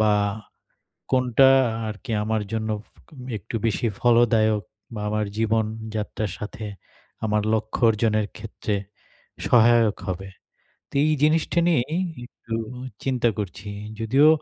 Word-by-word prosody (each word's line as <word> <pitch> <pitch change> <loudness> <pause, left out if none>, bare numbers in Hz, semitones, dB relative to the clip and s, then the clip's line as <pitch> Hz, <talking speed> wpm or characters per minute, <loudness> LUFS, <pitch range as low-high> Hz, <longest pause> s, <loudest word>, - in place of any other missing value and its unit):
বা, 110 -1 +4 1.0
কোনটা 130 0 +5 0.4
আরকি 110 +3 -6
আমার 110 0 0
জন্য 110 0 -1 0.7
একটু 100 - -10
বেশি 115 +2 0
ফলদায়ক 115 -3 +4 0.3
বা, 105 - -4
আমার 105 0 0
জীবনযাত্রার 110 -2 -1
সাথে 105 +1 -6 0.6
আমার 105 0 +1
লক্ষ্য 110 0 -1
অর্জনের 110 -1 +1
ক্ষেত্রে 110 -1 -4 0.7
সহায়ক 115 -2 +5
হবে। 95 +2 -4 0.6
তো - - -18
এই 155 - +3
জিনিসটা 160 +2 +3
নিয়েই 160 -1 +1 0.3
একটু 115 -2 -8 0.5
চিন্তা 125 -3 +2
করছি 105 0 -5 0.3
যদিও 135 +7 +5
110 Hz, 110 wpm, -24 LUFS, 105-120 Hz, 1.0 s, কোনটা